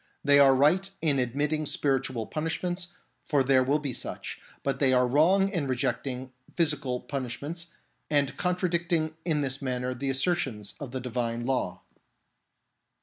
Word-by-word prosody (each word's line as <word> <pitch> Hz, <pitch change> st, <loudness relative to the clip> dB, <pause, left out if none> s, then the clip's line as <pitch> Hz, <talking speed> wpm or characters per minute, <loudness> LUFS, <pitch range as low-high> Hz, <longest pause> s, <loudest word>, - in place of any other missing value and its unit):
They 145 Hz, 0 st, +6 dB
are 135 Hz, -1 st, +7 dB
right 165 Hz, +9 st, +3 dB
in 145 Hz, -4 st, +3 dB
admitting 145 Hz, +5 st, 0 dB
spiritual 135 Hz, -5 st, 0 dB
punishments, 175 Hz, -, -2 dB, 0.4 s
for 145 Hz, -5 st, +2 dB
there 130 Hz, -1 st, +4 dB
will 140 Hz, +3 st, +2 dB
be 145 Hz, -4 st, -4 dB
such; -, -, -6 dB, 0.2 s
but 135 Hz, -1 st, -1 dB
they 135 Hz, -2 st, +5 dB
are 125 Hz, 0 st, +4 dB
wrong 175 Hz, +9 st, +4 dB
in 170 Hz, -8 st, -2 dB
re 130 Hz, -, 0 dB
jecting 130 Hz, +1 st, -2 dB, 0.2 s
physical 145 Hz, -6 st, 0 dB
punishments, 140 Hz, +6 st, -4 dB, 0.4 s
and 145 Hz, -2 st, +2 dB
contradicting 170 Hz, -3 st, 0 dB
in 155 Hz, -4 st, +1 dB
this 135 Hz, 0 st, -1 dB
manner 125 Hz, -1 st, -2 dB
the 135 Hz, +2 st, -2 dB
assertions 135 Hz, -, -1 dB
of 145 Hz, -4 st, -6 dB
the 130 Hz, +1 st, -4 dB
Divine 120 Hz, -1 st, -2 dB
Law. 120 Hz, -9 st, -1 dB
140 Hz, 145 wpm, -28 LUFS, 130-160 Hz, 0.4 s, are